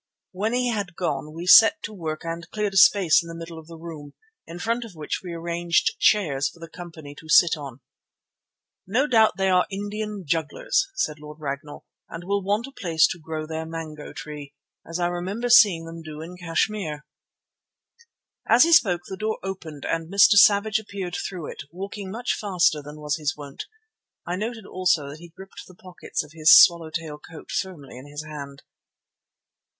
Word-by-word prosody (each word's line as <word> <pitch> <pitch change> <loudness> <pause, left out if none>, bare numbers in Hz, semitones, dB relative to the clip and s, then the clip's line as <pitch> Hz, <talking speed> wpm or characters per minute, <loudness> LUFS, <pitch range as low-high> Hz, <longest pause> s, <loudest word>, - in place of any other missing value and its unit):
When 210 +5 -2
he 250 0 +1
had 200 -6 -3
gone 150 -4 -3
we 165 +3 -7
set 225 +12 +7
to 215 - -6
work 160 -5 -5
and 165 +1 -5
cleared 210 -2 -2
a - - -1
space 185 -4 +6
in 170 - -11
the 165 - -8
middle 165 0 -8
of 155 - -15
the 165 -1 -11
room, 160 -3 -10 0.3
in 170 - -8
front 230 +6 -1
of 220 -6 -11
which 155 +5 -4
we 180 - -7
arranged 170 - 0
chairs 155 - +2
for 170 - -19
the 165 - -9
company 165 -4 -10
to 160 - -15
sit 170 +2 +6
on. 140 -4 -9 1.1
"No 245 +9 +2
doubt 220 -8 +3
they 195 0 +1
are 185 -1 +3
Indian 205 0 -5
jugglers," 395 - 0
said 160 - -2
Lord 150 +1 -11
Ragnall, 145 0 -6 0.2
"and 165 +1 -8
will 200 +2 -1
want 205 +4 0
a 275 - -11
place 170 -10 +2
to 175 - -6
grow 155 -1 -5
their 160 0 -4
mango 160 -2 -7
tree, 145 -2 -9 0.3
as 165 +2 -4
I 175 - +1
remember 185 +7 -3
seeing 195 -9 +6
them 165 0 -9
do 155 -1 -9
in 165 +3 -8
Kashmir." 165 -2 -2 1.4
As 235 - +7
he 335 +1 +3
spoke 185 - +4
the 190 - -6
door 215 +1 -2
opened 165 -6 -7
and 165 +1 -3
Mr. 200 +2 +6
Savage 205 +2 +5
appeared 195 -4 -6
through 180 -5 -5
it, - - -9
walking 195 +3 -7
much 235 +5 -2
faster 180 -7 +1
than 150 +1 -11
was 150 0 -2
his 150 -1 -2
wont. 145 -2 -8 0.6
I 175 - -2
noted 220 +2 -5
also 180 -7 0
that 145 +2 -10
he 170 +1 -12
gripped 190 +3 -12
the 185 - -16
pockets 180 -3 -5
of 150 - -15
his 155 -1 +7
swallow 170 -2 +5
tail 155 -2 -6
coat 160 +1 -12
firmly 150 -9 -5
in 135 - -12
his 145 +1 -7
hand. 140 -2 -9
170 Hz, 190 wpm, -24 LUFS, 155-200 Hz, 1.4 s, set